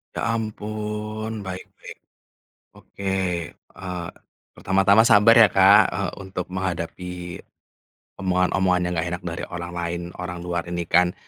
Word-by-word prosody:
Ya - - -3
ampun, 110 0 -4 0.2
baik 95 0 -5 0.2
baik. - - -10 0.8
Oke, 100 - -13 0.5
eee, 90 -3 -7 0.5
pertama-tama 95 +2 +4
sabar 115 -1 +6
ya, 110 - +9
Kak, 100 +2 +7
eee, - - -2
untuk 95 -2 -5
menghadapi 90 -1 -5 0.8
omongan-omongan 90 -1 +1
yang 90 0 -1
nggak 80 +2 0
enak 90 0 -4
dari 85 - -5
orang 85 0 -5
lain, 85 0 -3 0.2
orang 90 -1 -5
luar 85 -1 -3
ini 85 0 -2
kan. 90 +1 +5
90 Hz, 130 wpm, -23 LUFS, 90-105 Hz, 0.8 s, ya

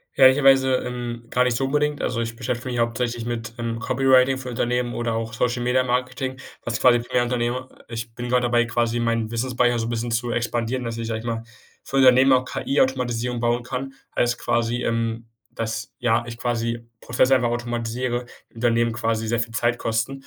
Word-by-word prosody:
Ehrlicherweise, 135 0 +6
ähm, 120 -2 -3
gar 125 - +3
nicht 125 -2 +1
so 135 - 0
unbedingt. 150 +2 0
Also, 120 -2 -1
ich 115 0 -3
beschäftige 120 +1 -3
mich 120 - -2
hauptsächlich 115 0 -1
mit, 115 -1 -4
ähm, 115 -1 -3
Copywriting 130 +2 +3
für 130 -1 -6
Unternehmen 120 0 -1
oder 120 -1 -1
auch 115 0 -3
Social-Media-Marketing, 125 +2 0 0.3
was 115 -1 -2
quasi 125 -1 +6
primär 120 +1 0
Unternehmer 120 +1 -1 0.2
ich 115 0 -6
bin 120 0 -5
grad 125 0 +2
dabei, 120 -1 +3
quasi 120 0 0
meinen 115 -1 0
Wissens-Speicher 120 0 +1
so 115 0 -2
bisschen 120 0 -2
zu 120 +1 -1
expandieren, 120 +1 -1
dass 115 -1 -4
ich, 115 - -3
sage 110 -1 -2
ich - - -12
mal, 115 -1 -3 0.4
für 135 - -5
Unternehmen 130 0 +6
auch 130 0 +2
KI-Automatisierung 125 -3 0
bauen 120 +1 +1
kann, 130 +2 -5 0.2
als 120 0 +1
quasi, 120 +1 0
ähm, 115 0 -1 0.2
dass, 110 -1 -4
ja, 120 -1 +2
ich 115 -1 -7
quasi 115 -1 -1 0.2
Prozesse 130 +3 +3
einfach 125 -2 +2
automatisiere, 120 +1 -2 0.3
Unternehmen 115 0 +1
quasi 115 -1 -1
sehr 115 +1 0
viel 115 0 -3
Zeit 120 +1 +1
kosten 115 +3 -1
120 Hz, 180 wpm, -23 LUFS, 115-125 Hz, 0.4 s, Ehrlicherweise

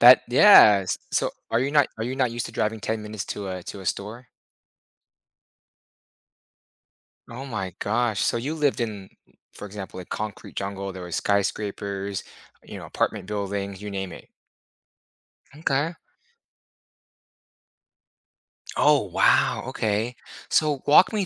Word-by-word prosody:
That 125 +2 +9
Yes! 105 - +7
So, - - +1 0.2
are 115 - +2
you 135 +2 0
not 145 -2 +4
are 110 - -2
you 125 +2 -3
not 130 -3 +1
used 120 0 -3
to - - -10
driving 110 +1 -1
10 110 +2 -2
minutes 105 -1 -5
to 100 -2 -5
a 90 -1 -5
to 100 - -8
a 95 - -10
store? 110 +7 -4 3.0
Oh 125 +4 -8
my 100 -8 -4
gosh. 110 -1 0
So - - +1
you 140 +7 -3
lived 145 -4 +1
in 105 -4 -3
m - - -17 0.4
for - - -9
example, 100 -2 -8
a 90 - -8
concrete 105 +2 -6
jungle. 100 0 -4
There 95 - -8
were 90 - -8
skyscrapers, 100 0 -1 0.4
you - - -9
know, - - -8
apartment - - -2
buildings, 100 -1 -4
you 105 - -6
name 95 -2 -4
it. - - -12 1.3
M'kay. 150 +2 0 2.8
Oh, 150 -1 +5
wow, 90 - +3
okay. 110 +3 -1 0.3
So 150 -4 +2
walk 150 +5 +6
me 205 -3 0
105 Hz, 140 wpm, -25 LUFS, 100-125 Hz, 3.0 s, That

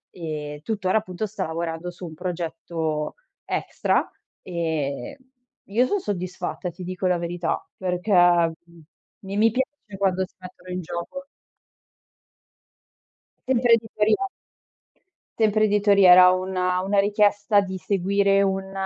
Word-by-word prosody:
e 150 -3 -5
tuttora, 200 -2 0
appunto, 185 0 -5
sta 200 -2 -4
lavorando 165 +1 -4
su 175 +1 -10
un 160 - -8
progetto 165 -2 -3 0.3
extra - - 0 0.4
e 160 - -3 0.5
io 230 +6 +2
son 410 - 0
soddisfatta, 185 - -4
ti 180 +2 -10
dico 185 +1 -2
la 180 -1 +2
verità, 170 0 -2
perché, 180 +2 -2
mhmm, 170 -2 +3 0.4
mi 195 +1 -4
mi 220 +2 +5
piace 260 -5 -4
quando 190 -1 +1
si - - -36
mettono 180 0 -12
in 180 0 -3
gioco. 170 - -6 2.2
Sempre 245 -2 +3
editoria. 220 - +2 1.2
Sempre 215 -1 +3
editoria, 200 -3 +5
era 180 0 +9
una 185 0 0
una 200 +2 +1
richiesta 205 0 +3
di 190 -1 -3
seguire 200 +2 +2
un 195 0 -1
185 Hz, 120 wpm, -24 LUFS, 170-205 Hz, 2.2 s, era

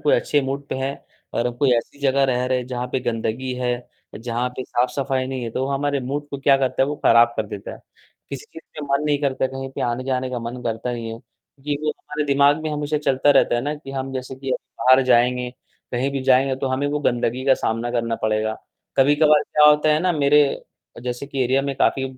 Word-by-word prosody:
कोई 150 -1 +3
अच्छे 145 - +1
मूड 140 +1 -4
पे - - -3
हैं 135 +1 -3 0.4
और 120 - +1
हम 120 - -3
कोई 140 0 +2
ऐसी 120 +4 -4
जगह 140 0 +3
रह 125 -2 +1
रहे 130 0 +1
हैं 125 - -5
जहाँ 125 -1 -3
पे 130 - 0
गंदगी 120 +1 -2
है, 125 -1 -3 0.3
जहाँ 120 +2 -2
पे 130 - -4
साफ़-सफ़ाई 130 +1 -1
नहीं 130 -1 -4
है, 115 - -4
तो 130 +4 -2
हमारे 140 0 -1
मूड 145 +3 -4
को 140 - -5
क्या 140 0 +4
करता 135 -1 +1
है, - - +2
वो 150 - -3
खराब 120 0 +6
कर 110 - -1
देता 100 -1 -7
है। - - -14 0.5
किसी 140 -2 -6
चीज़ 160 - -12 0.2
का 150 - -4
मन 145 - 0
नहीं 145 -1 +1
करता, 135 -2 0
कहीं 135 0 -6
पे - - -6
आने-जाने 130 +1 -1
का 125 - -3
मन 120 +2 -6
करता 115 +1 -3
नहीं 115 -2 -5
है 115 - -7
क्योंकि 145 +4 -7
वो 155 - +1
हमारे 150 0 -5
दिमाग 140 +2 +3
में 155 - -2
हमेशा 150 0 -1
चलता 145 -1 +2
रहता 135 -3 +4
है 120 - +1
ना 145 +3 -2
कि 145 -2 -10
हम 135 0 -4
जैसे 130 0 -5
कि 135 0 -5
अभी 130 - -3
बाहर 130 +1 +6
जाएँगे, 125 0 +2 0.4
कहीं 130 +3 0
भी 140 -1 -2
जाएँगे, 130 0 +3
तो 135 - -3
हमें 130 +2 0
वो 145 +1 -1
गंदगी 120 -1 0
का 135 -1 +5
सामना 115 0 -2
करना 115 -1 -1
पड़ेगा। 110 0 0 0.4
कभी-कभार 145 +2 +5
क्या 150 0 +3
होता 150 +1 +4
है 150 - +3
ना 180 +1 +2
मेरे 150 -1 +4 0.6
जैसे 125 +2 -4
कि 135 -2 -2
एरिया 130 +2 +2
में 140 0 -2
काफ़ी 135 - +2
130 Hz, 235 wpm, -22 LUFS, 125-140 Hz, 0.6 s, खराब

